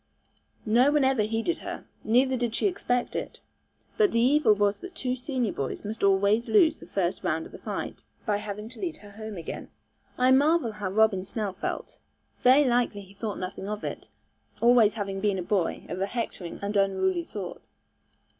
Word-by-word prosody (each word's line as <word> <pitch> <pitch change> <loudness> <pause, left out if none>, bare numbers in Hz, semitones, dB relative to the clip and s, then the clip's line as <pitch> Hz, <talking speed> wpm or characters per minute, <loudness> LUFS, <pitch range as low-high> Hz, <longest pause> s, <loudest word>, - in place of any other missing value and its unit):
No 240 +6 +4
one 295 -2 +3
ever 265 -3 +3
heeded 225 +10 -1
her, - - -7 0.2
neither 255 +4 +3
did 240 -2 -1
she - - 0
expect 245 -10 0
it; - - -4 0.6
but 425 -2 +4
the 230 - +2
evil 260 -2 +5
was 205 0 +1
that 370 0 -9
two 255 -1 -1
senior 250 -4 -2
boys 135 +8 -4
must 215 +1 -5
always 200 +4 +3
lose 310 +9 +5
the - - -13
first 185 -1 -1
round 160 -2 0
of - - -12
the - - -10
fight, - - -5 0.2
by 210 -2 +1
having 210 +1 -6
to 250 - -12
lead 345 -4 -3
her 205 -1 -14
home 215 -1 -7
again. 165 - -6 0.5
I 255 +1 +4
marvel 285 -1 +4
how 210 -2 -4
Robin 205 -1 +3
Snell 205 -1 -3
felt. 200 - -5 0.4
Very 260 +4 +6
likely 240 -5 +1
he 195 0 -15
thought 205 0 -4
nothing 190 +2 -5
of 210 0 -4
it, - - -6 0.5
always 235 -3 +5
having 195 -3 -3
been 205 -2 +1
a 180 - -2
boy 185 -2 -1
of 180 +2 -4
a 195 - +1
hectoring 205 -6 -4
and 205 +1 -2
unruly 190 -3 +2
sort. 190 0 -7
215 Hz, 190 wpm, -27 LUFS, 195-250 Hz, 0.6 s, Very